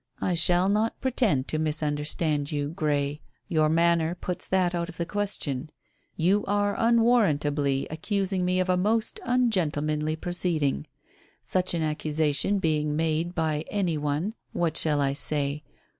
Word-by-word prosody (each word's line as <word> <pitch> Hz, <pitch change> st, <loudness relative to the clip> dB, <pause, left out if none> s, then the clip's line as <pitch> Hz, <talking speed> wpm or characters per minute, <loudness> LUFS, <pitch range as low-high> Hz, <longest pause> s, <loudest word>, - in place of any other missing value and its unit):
"I 180 Hz, -, 0 dB
shall 175 Hz, +2 st, +3 dB
not 215 Hz, +3 st, 0 dB
pretend 230 Hz, -, +1 dB
to 155 Hz, -, -1 dB
misunderstand 150 Hz, -1 st, -1 dB
you, 145 Hz, -1 st, -2 dB
Grey. 150 Hz, -3 st, -1 dB, 0.3 s
Your 155 Hz, -5 st, +2 dB
manner 170 Hz, +1 st, +2 dB
puts 180 Hz, 0 st, -4 dB
that 185 Hz, -2 st, +1 dB
out 170 Hz, 0 st, -2 dB
of 165 Hz, -, -11 dB
the 170 Hz, -, -2 dB
question. 165 Hz, -8 st, -3 dB, 0.5 s
You 190 Hz, +5 st, +2 dB
are 205 Hz, 0 st, +1 dB
unwarrantably 155 Hz, -, +2 dB
accusing 190 Hz, +3 st, -1 dB
me 180 Hz, +1 st, +1 dB
of 185 Hz, -, +1 dB
a 180 Hz, 0 st, +2 dB
most 215 Hz, +4 st, 0 dB
ungentlemanly 155 Hz, -11 st, 0 dB
proceeding. 160 Hz, -4 st, 0 dB, 0.6 s
Such 185 Hz, -1 st, 0 dB
an 165 Hz, -, -1 dB
accusation 155 Hz, +3 st, +1 dB
being 150 Hz, -4 st, 0 dB
made 165 Hz, +2 st, -1 dB
by 155 Hz, -2 st, 0 dB
any 185 Hz, -5 st, 0 dB
one 150 Hz, +7 st, -2 dB, 0.2 s
what 165 Hz, -2 st, 0 dB
shall 150 Hz, -3 st, +2 dB
I 135 Hz, -1 st, +1 dB
say? 145 Hz, 0 st, -1 dB
165 Hz, 145 wpm, -26 LUFS, 150-185 Hz, 0.6 s, shall